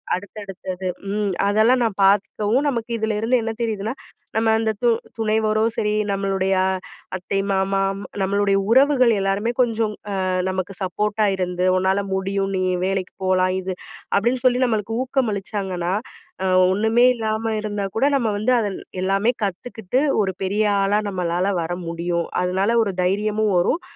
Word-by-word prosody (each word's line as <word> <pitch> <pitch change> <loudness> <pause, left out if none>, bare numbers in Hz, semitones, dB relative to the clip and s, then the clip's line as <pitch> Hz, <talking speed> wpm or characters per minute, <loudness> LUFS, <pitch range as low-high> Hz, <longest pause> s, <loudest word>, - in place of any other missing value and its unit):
அடுத்தடுத்தது 190 -1 -6 0.2
ம் 205 -1 -1
அதெல்லாம் 220 +5 +3
நான் 225 -4 0
பார்க்கவும், 210 +6 +2
நமக்கு 235 -4 -2
இதுல 220 -1 -1
இருந்து 225 +4 +1
என்ன 225 0 -2
தெரியுதுன்னா, 220 -1 -2 0.4
நம்ம 225 0 +3
அந்த 225 0 0
து 240 - +5 0.3
துணைவரும் 220 0 +1
சரி 210 0 0 0.2
நம்மளுடைய 195 -1 0
அ - - +2 0.5
அத்தை, 190 +2 -2
மாமா 195 0 +1 0.2
ம் - - -7 0.2
நம்மளுடைய 200 +1 +2
உறவுகள் 260 -1 +5
எல்லாருமே 195 +4 0
கொஞ்சம் 225 -3 0 0.2
அ - - -2 0.4
நமக்கு 185 +1 -3
சப்போர்ட்டா 210 +3 0
இருந்து, 180 -1 -1
"உன்னால 190 +2 +1
முடியும். 195 +1 -1
நீ 185 - 0 0.2
வேலைக்கிப் 190 0 -3
போலாம் 185 0 +2
இது" 185 0 -4 0.4
அப்டின்னு 240 +4 0
சொல்லி 250 0 +4
நம்மளுக்கு 225 -1 -1
ஊக்கம் 260 -2 0
அளிச்சாங்கன்னா, 190 -3 -3 0.5
அ - - 0 0.3
ஒண்ணுமே 220 +4 +3
இல்லாம 220 0 -2
இருந்தாக்கூட 205 +2 -2
நம்ம 235 -4 0
வந்து 240 +5 +2
அதில் 205 -4 -2 0.2
எல்லாமே 195 +5 +2
கத்துக்கிட்டு 220 +4 -2 0.2
ஒரு 190 -2 -1
பெரிய 205 +3 +1 0.2
ஆளா 205 +2 +2
நம்மளால 180 +1 -1
வர 165 - -5 0.2
முடியும். 170 0 -2 0.2
அதுனால 190 +6 +1
ஒரு 200 -3 -2
தைரியமும் 210 +2 +1
வரும், 180 - +1
205 Hz, 145 wpm, -22 LUFS, 190-225 Hz, 0.5 s, து